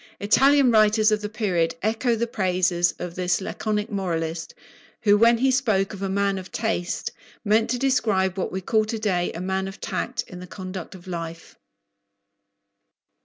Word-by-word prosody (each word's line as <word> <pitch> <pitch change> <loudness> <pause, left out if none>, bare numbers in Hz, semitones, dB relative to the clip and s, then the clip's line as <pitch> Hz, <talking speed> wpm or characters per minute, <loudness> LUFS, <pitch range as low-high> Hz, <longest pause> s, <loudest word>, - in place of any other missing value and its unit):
Italian 270 +6 +4
writers 215 0 +4
of 215 0 +1
the 210 - -4
period 180 -7 0
echo 230 +3 +1
the 230 +1 0
praises 180 -5 +1
of 175 -1 -6
this 180 -1 0
laconic 210 +3 -3
moralist, 165 -4 -3 0.5
who, 205 -1 +5
when 230 +2 +5
he 265 +3 +2
spoke 220 -7 +1
of 200 - -8
"a 195 - -1
man 200 0 0
of 185 - -11
taste," 215 -6 -2 0.3
meant 220 +2 +3
to 250 - 0
describe 220 -8 +1
what 190 - -2
we 190 - -3
call 215 +4 +2
to 220 +1 -3
day 185 -5 0
"a 165 - -6
man 190 +1 -2
of 195 - -9
tact" - - -3
in 180 - -9
the 180 - -9
conduct 185 -1 -7
of 175 - -13
life. 165 -2 -7
200 Hz, 170 wpm, -24 LUFS, 180-220 Hz, 0.5 s, who